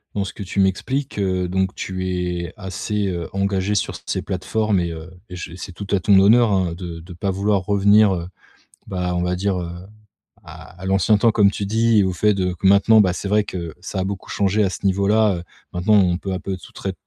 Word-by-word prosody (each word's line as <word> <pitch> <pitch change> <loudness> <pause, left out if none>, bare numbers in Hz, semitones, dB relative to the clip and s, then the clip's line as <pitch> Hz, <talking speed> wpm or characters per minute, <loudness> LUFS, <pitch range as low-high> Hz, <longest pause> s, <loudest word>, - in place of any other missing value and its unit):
dans 100 - 0
ce 95 - -5
que 100 - -7
tu 95 +1 -1
m'expliques, 130 +7 -1
heu, 95 -2 0
donc 95 +1 -1
tu 95 -1 -4
es 90 -2 -3
assez, 100 +1 -3
heu, 85 -2 -4
engagé 100 +1 0
sur 100 - -1
ces - - -1
plateformes 100 +1 -1
et 85 -1 -2
heu, 80 +2 -9 0.2
je 90 -2 -7
c'est 95 0 -8
tout 100 +2 -8
à 100 - +3
ton 100 +1 +4
honneur, 110 +3 +5
hein, 90 -3 +1
de 85 -2 -7
de 90 +2 -11
pas 95 +3 -2
vouloir 100 +1 +1
revenir, 100 0 +4
heu, 85 -1 -5 0.6
bah, 90 -1 -2
on 90 - 0
va 90 0 0
dire: 95 0 -1
«Heu, 85 - -5 0.8
à 90 - -13
à - - -6
l'ancien 95 +2 +3
temps» 115 +2 +3
comme 100 -3 +4
tu 100 - -4
dis 110 +1 +3
et - - +4
au 95 - -1
fait 105 +4 +2
de 90 -2 -1
que 90 - -6
maintenant, 105 +3 +6
bah, 95 -3 +2
c'est 95 - -5
vrai 105 +1 +2
que 85 -5 -6
ça 95 +1 -5
a - - 0
beaucoup 100 -1 -6
changé 100 +1 +1
à 95 - +1
ce 95 - -7
niveau-là, 100 +1 +3
heu. 85 - -7 0.3
Maintenant, 95 +5 +2
on 90 -4 +3
peut 95 0 -5
à 90 - -3
peu 95 0 -4
tout 90 - -15
tré 95 -1 -5
95 Hz, 235 wpm, -21 LUFS, 90-100 Hz, 0.8 s, maintenant